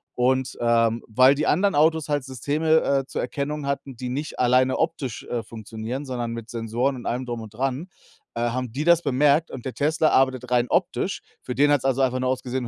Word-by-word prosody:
Und 130 +1 +1
ähm, 115 -1 +2
weil 130 +5 +5
die 150 - -1
anderen 195 +4 +2
Autos 160 +1 +2
halt 145 -3 0
Systeme, 150 +5 +1
äh, 135 -1 +1
zur - - -3
Erkennung 145 0 -3
hatten, 140 -1 -3
die 125 +1 -5
nicht 145 +5 -4
alleine 130 +1 +3
optisch, 160 -7 -2
äh, 120 -2 -4
funktionieren, 115 +3 -6
sondern 120 -3 -3
mit 115 -1 -7
Sensoren 120 +3 -1
und 120 - -10
allem 125 +2 -2
Drum 120 -1 -4
und 110 -1 -10
Dran, 135 +7 -2 0.5
äh, 115 - -2
haben 120 0 -2
die 140 +4 -2
das 170 0 +5
bemerkt 145 +2 +2
und 125 - -8
der 130 - -5
Tesla 155 +2 +2
arbeitet 130 -2 +1
rein 120 0 +3
optisch. - - 0 0.2
Für 125 - -5
den 145 +2 +4
hat's 145 -3 +2
also 135 0 +1
einfach 130 -1 +1
nur 130 0 0
ausgesehen: 130 -1 -2
130 Hz, 210 wpm, -24 LUFS, 120-145 Hz, 0.5 s, weil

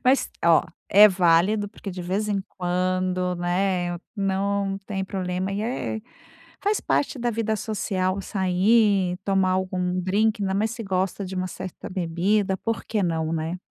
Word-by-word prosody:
Mas 260 +2 +3
ó, 170 -1 +5 0.3
é 205 +2 +9
válido 185 +3 +3
porque 205 -1 -8
de 185 0 -6
vez 190 +4 -1
em 205 -2 0 0.2
quando, 185 0 0
né, 175 0 0 0.2
não 195 0 0
tem 195 -2 -2
problema 185 0 -3
e 200 - -2
é 225 -1 -3 0.6
faz 415 +1 +2
parte 285 - 0
da 240 0 0
vida 220 -1 -1
social 195 -3 -1
sair, 190 0 +2
tomar 195 -2 +2
algum 185 -1 -1
drinque, 205 +4 +1
ainda 190 -1 0
mais 215 +3 +1
se 230 0 -6
gosta 190 0 -1
de 185 - -7
uma 185 0 -1
certa 185 0 -7
bebida, 190 +3 0
por 225 +3 -3
que 215 -2 -1
não, 165 -2 -1
né? 165 +2 -2
190 Hz, 160 wpm, -24 LUFS, 180-205 Hz, 0.6 s, é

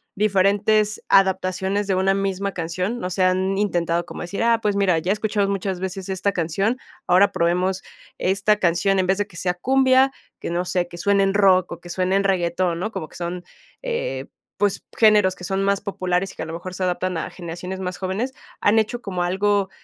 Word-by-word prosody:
diferentes 205 +1 +2
adaptaciones 190 +1 +2
de 195 - 0
una 190 +1 +2
misma 195 0 -2
canción. 180 +7 -3
No 180 - -2
sé, 185 +1 +1
¿han 185 +1 +1
intentado 175 -4 0
como - - -8
decir, 175 +5 -4
ah, 230 -1 +3
pues, 205 -1 0
mira, 185 -4 +3
ya 180 +4 -1
he - - +4
escuchado 210 -1 0
muchas 195 -2 -2
veces 190 0 -4
esta 190 +1 0
canción, 195 +7 0 0.3
ahora 190 +3 +4
probemos 180 +3 0 0.3
esta 195 +3 +2
canción, 185 +1 +2
en 185 - +1
vez 190 +1 +2
de 205 - 0
que 170 - -18
sea 180 +1 -1
cumbia, 265 +6 +3 0.3
que - - -5
no 175 +1 0
sé, 180 -1 -1
que 175 - -11
suene 200 +2 +2
en 195 0 +1
rock, 185 -3 +4
o 170 - -9
que 175 - -12
suene 185 +1 0
en 195 - +2
reggaetón, 175 -2 0
¿no? 210 +5 -3
Como 155 - -5
que - - -17
son, 175 +1 -4 0.4
eh, - - -3 0.3
pues, 205 -2 0
géneros 210 -4 +5
que - - -13
son 195 +2 -1
más 200 0 +1
populares 185 -1 -1
y - - -17
que - - -5
a - - -5
lo 160 - -7
mejor 180 +2 -6
se 185 - -4
adaptan 180 0 -1
a - - -3
generaciones 180 +2 -7
más 180 -1 -4
jóvenes, 200 +8 -3 0.3
¿han 210 +2 +4
hecho 220 +3 -2
como 185 -5 -3
algo 195 +2 +1
190 Hz, 210 wpm, -22 LUFS, 180-200 Hz, 0.4 s, géneros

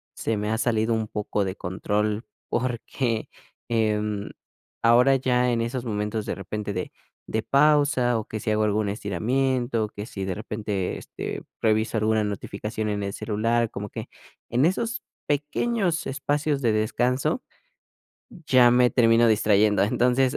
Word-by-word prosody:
se 115 - -1
me 105 +1 -2
ha 110 - +1
salido 115 -1 +1
un 110 -1 -1
poco 105 -1 -2
de 95 0 -3
control, 105 +4 -2 0.2
porque, 120 -1 -2 0.4
em, 105 -2 0 0.6
ahora 125 +4 +6
ya 125 -1 +2
en 115 - 0
esos 120 +2 -3
momentos 105 0 -2
de - - -3
repente 100 +2 -4
de 90 - -4 0.4
de 110 - -1
pausa 140 -3 +3
o 110 - -6
que 110 - -4
si 110 - -1
hago 110 0 +2
algún 105 0 +1
estiramiento, 120 +4 0
que 105 0 -7
si 95 -4 -5
de 95 - -2
repente, 105 -3 -3
este, - - -6 0.2
reviso 110 0 +1
alguna 110 0 +2
notificación 105 +1 -4
en 105 -1 -2
el 100 0 -3
celular, 115 +2 0
como 105 +1 -5
que - - -7 0.4
en 125 +4 +3
esos 230 +6 -1 0.2
pequeños 165 +5 0
espacios 145 +1 -1
de 120 -4 +3
descanso 125 - 0 0.9
ya 130 -7 +4
me 125 0 +5
termino 115 -1 +4
distrayendo. 105 -1 +3
Entonces, 125 +4 +2
110 Hz, 145 wpm, -25 LUFS, 105-125 Hz, 0.9 s, ahora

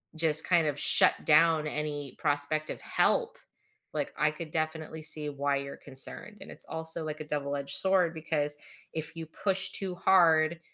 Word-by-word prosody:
just 160 -1 +7
kind 170 -4 0
of 145 -1 -5
shut - - +4
down 155 0 +2
any 145 -2 -7
prospective 150 +1 0
help, - - -2 0.6
like, - - -6
I 150 +1 0
could 155 0 -11
definitely 155 0 -6
see 155 -1 +1
why 140 0 -4
you're 140 0 -9
concerned, 145 +10 +2
and - - -13
it's - - +3
also 160 0 +2
like 155 0 -8
a 150 - -10
double 145 -1 -5
edged 140 0 -3
sword 185 -1 +2
because 150 -2 0 0.4
if 160 +1 -3
you 165 - -9
push 190 +3 -3
too 190 -2 -5
hard, 170 -3 +1
155 Hz, 170 wpm, -26 LUFS, 145-165 Hz, 0.6 s, just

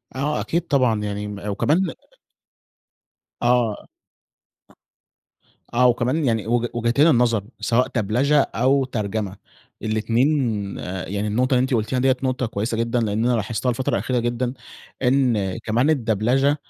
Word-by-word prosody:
آه 145 +3 -1
أكيد 170 +1 -2
طبعًا، 125 -6 +2
يعني 105 0 -3
م 105 0 -6
وكمان 155 - +1 1.5
آه. 120 -3 +1 1.9
آه، 125 +1 +5
وكمان 125 +6 +1
يعني 115 -3 0
وج 120 0 +1
وجهتين 120 +6 +3
النظر 115 -7 +3 0.2
سواء 125 +2 +2
دبلچة 120 +7 +1
أو 135 +2 +1
ترجمة، 105 -4 -3 0.5
الاتنين 115 +5 +1 0.8
يعني 100 +2 -2
النقطة 125 +5 +1
اللي 125 - +4
أنتِ 130 0 -1
قُلتيها 115 +3 0
دِيَّة 130 0 +3
نقطة 130 -1 0
كويسة 110 +1 -2
جدًا، 115 +1 0
لأن 110 0 0
أنا 125 0 +3
لاحظتها 115 +2 -1
الفترة 125 +2 -1
الأخيرة 120 +5 0
جدًا. 120 +1 -1 0.5
إن 125 -7 +1
كمان 115 +5 0 0.2
الدبلچة، 125 +7 +2
120 Hz, 130 wpm, -22 LUFS, 110-130 Hz, 1.9 s, آه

